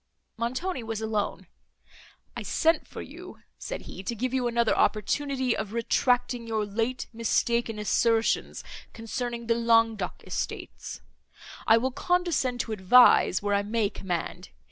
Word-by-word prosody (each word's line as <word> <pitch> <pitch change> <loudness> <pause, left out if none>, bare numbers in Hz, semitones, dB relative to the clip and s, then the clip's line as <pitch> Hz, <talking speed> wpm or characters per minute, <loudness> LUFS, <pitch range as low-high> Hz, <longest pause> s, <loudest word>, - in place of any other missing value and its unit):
Montoni 255 +7 -2
was 225 -1 -4
alone. 220 -2 -2 0.9
"I - - -5
sent 325 +1 +1
for - - -8
you," - - -11 0.2
said - - -5
he, - - -9
"to 215 +5 -4
give 255 +3 -2
you 255 -2 +1
another 235 -1 +2
opportunity 260 +4 +1
of 215 -1 -4
retracting 245 +1 +1
your 220 -2 -1
late 225 +5 -2
mistaken 230 0 0
assertions 225 +2 +1 0.3
concerning 235 +1 -4
the 230 - +2
Languedoc 230 -4 +1
estates. - - -5 0.7
I 225 - +7
will 260 +3 0
condescend 330 -7 0
to - - -6
advise, 210 -1 +5
where 205 0 0
I 200 - +3
may 210 0 0
command. 175 - -4
230 Hz, 135 wpm, -27 LUFS, 215-250 Hz, 0.9 s, I